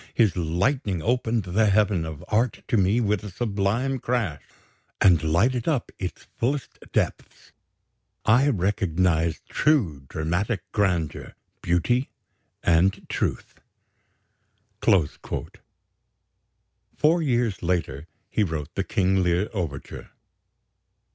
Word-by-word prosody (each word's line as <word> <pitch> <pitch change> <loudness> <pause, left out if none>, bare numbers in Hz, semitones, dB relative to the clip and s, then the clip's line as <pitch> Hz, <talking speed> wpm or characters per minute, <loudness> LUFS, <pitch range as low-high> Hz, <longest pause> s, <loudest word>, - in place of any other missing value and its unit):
His 110 -6 +3
lightning 90 - 0
opened 115 0 +1
the 100 +4 +2
heaven 100 -4 +2
of 80 -2 -8
art 115 +2 0
to - - +2
me 100 +4 +3
with 105 -3 0
a 105 - -6
sublime 110 +6 -1
crash, 110 - -1 0.6
and 90 -5 +5
lighted 110 +10 +1
up 145 -7 0
its 90 -2 -5
fullest 135 +4 -2
depths. - - -2 0.7
I 125 +6 +5
recognized 90 - 0
true 90 - +1
dramatic 85 +7 -1
grandeur, 90 -8 -1 0.3
beauty, 120 +10 +1 0.5
and 90 +4 +2
truth." - - -3 1.2
Four 85 -7 +4 2.1
years 120 - 0
later 85 -4 -2 0.2
he 105 - +2
wrote 80 -6 -4
the - - -1
"King 95 0 +1
Lear" 90 +3 +1
overture. 80 -9 -5
95 Hz, 100 wpm, -25 LUFS, 85-115 Hz, 2.1 s, and